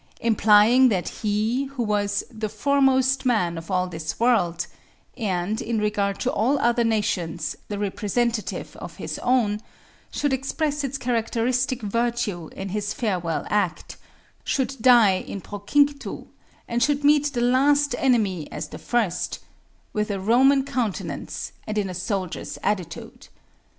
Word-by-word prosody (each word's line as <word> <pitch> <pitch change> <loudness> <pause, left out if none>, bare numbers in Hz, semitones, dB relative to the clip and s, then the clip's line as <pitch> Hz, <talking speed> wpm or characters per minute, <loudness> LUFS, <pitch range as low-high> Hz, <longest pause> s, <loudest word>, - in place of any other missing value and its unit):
Implying 225 +3 +5
that 185 -5 -1
he, 220 +5 0
who 270 -3 -4
was 205 -1 0
"the 215 -2 -4
foremost 270 0 +2
man 215 -10 +1
of 165 +2 -8
all 185 -1 +1
this 160 -2 -5
world," 175 -8 +2 0.5
and, 200 -2 -1
in 230 0 -2
regard 205 -2 0
to - - +1
all 255 +7 +2
other 240 -2 +2
nations, 180 -7 -1
the 205 - -4
representative 215 +3 -2
of - - -8
his - - -5
own, 225 -5 +1 0.5
should 290 -2 0
express 290 +2 -1
its 275 0 -2
characteristic 245 +1 0
virtue 215 -5 -1
in 195 0 -6
his 205 +1 -3
farewell 180 -8 -1
act 185 -7 -1 0.5
should 270 0 -1
die 230 -6 +6
in 200 - -6
procinctu 280 +9 0 0.4
and 235 0 -1
should 290 +2 +2
meet 295 0 +4
the 240 - -1
last 280 +3 +3
enemy 210 - +1
as - - -5
the - - -9
first, 215 -8 -1 0.6
with 210 0 -1
a 200 -1 -2
Roman 265 +7 +4
countenance 240 -7 -3 0.2
and 215 0 -3
in 195 -3 0
a - - -6
soldier's 185 0 -3
attitude. 180 -6 -3
220 Hz, 140 wpm, -24 LUFS, 200-255 Hz, 0.6 s, die